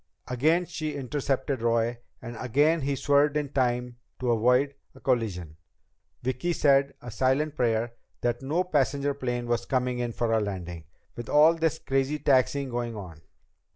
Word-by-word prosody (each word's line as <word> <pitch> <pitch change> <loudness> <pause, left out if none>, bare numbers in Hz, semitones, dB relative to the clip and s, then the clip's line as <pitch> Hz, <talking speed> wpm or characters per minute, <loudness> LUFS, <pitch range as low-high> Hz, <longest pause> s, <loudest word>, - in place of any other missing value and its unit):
Again 155 +8 +2
she 155 -3 -4
intercepted 135 -1 -2
Roy, 115 0 +1 0.2
and 120 0 -7
again 145 +7 +2
he 140 0 -1
swerved 145 +2 +3
in 145 -2 -2
time 125 -2 -1 0.2
to 125 -1 0
avoid 125 +5 +3 0.2
a - - -14
collision. 95 - -1 0.7
Vicki 130 +8 -1
said 140 -2 +3
a 120 - -7
silent 135 +6 +1
prayer 115 -1 0 0.3
that 120 +1 -1
no 155 +7 0
passenger 145 -4 0
plane 125 -3 -3
was 120 0 -1
coming 125 -1 0
in 120 -1 -2
for 115 0 -1
a 110 - +4
landing, 90 -5 -5 0.3
with 120 -1 -7
all 155 +3 +6
this 160 -1 0
crazy 135 +1 0
taxiing 140 -1 +2
going 120 -1 -3
on. 90 -7 -9
130 Hz, 155 wpm, -27 LUFS, 120-145 Hz, 0.7 s, all